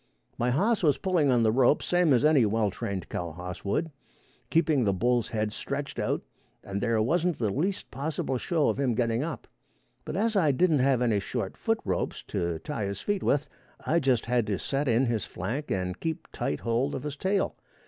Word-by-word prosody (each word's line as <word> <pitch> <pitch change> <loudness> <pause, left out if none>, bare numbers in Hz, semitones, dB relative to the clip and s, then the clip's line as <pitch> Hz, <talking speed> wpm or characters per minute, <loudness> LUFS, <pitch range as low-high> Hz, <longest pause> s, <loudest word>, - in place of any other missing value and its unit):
My 120 - 0
hoss 200 - +2
was 150 -6 +3
pulling 175 -7 +2
on 120 -2 +4
the 110 - +4
rope 130 +4 +3
same 175 -3 +3
as 130 +2 +4
any 150 -5 +5
well 105 -1 +1
trained 95 -1 -4
cow 85 -2 -4
hoss 90 +2 -7
would, 155 +11 -1 0.6
keeping 160 -5 +3
the 100 -3 +2
bull's 120 +3 +1
head 110 -2 -1
stretched - - -4
out, - - -1 0.4
and 100 0 -4
there 115 -2 +1
wasn't 175 +6 +1
the 110 -4 0
least 185 - -2
possible 135 -2 -2
show 160 0 +1
of - - -1
him 130 -4 +1
getting 115 0 +1
up; 165 0 -5 0.6
but - - -5
as 220 +3 +1
I 160 -8 +4
didn't 160 0 +3
have 130 -1 +3
any 110 -4 +2
short 100 0 -4
foot 225 -1 0
ropes 95 -3 -2
to 85 -1 -1
tie 110 - -4
his 100 0 -4
feet 205 -1 -1
with, 145 +1 +1 0.4
I 170 - +3
just 130 -5 +1
had 120 -2 +1
to 100 -2 0
set 140 +9 -2
in 120 +2 +3
his 115 -5 0
flank 120 - -4
and 90 -1 -2
keep 160 -1 -3
tight 75 - -2
hold 120 +5 0
of 130 - -5
his 150 -1 -4
tail. 190 +6 0
125 Hz, 205 wpm, -28 LUFS, 110-155 Hz, 0.6 s, any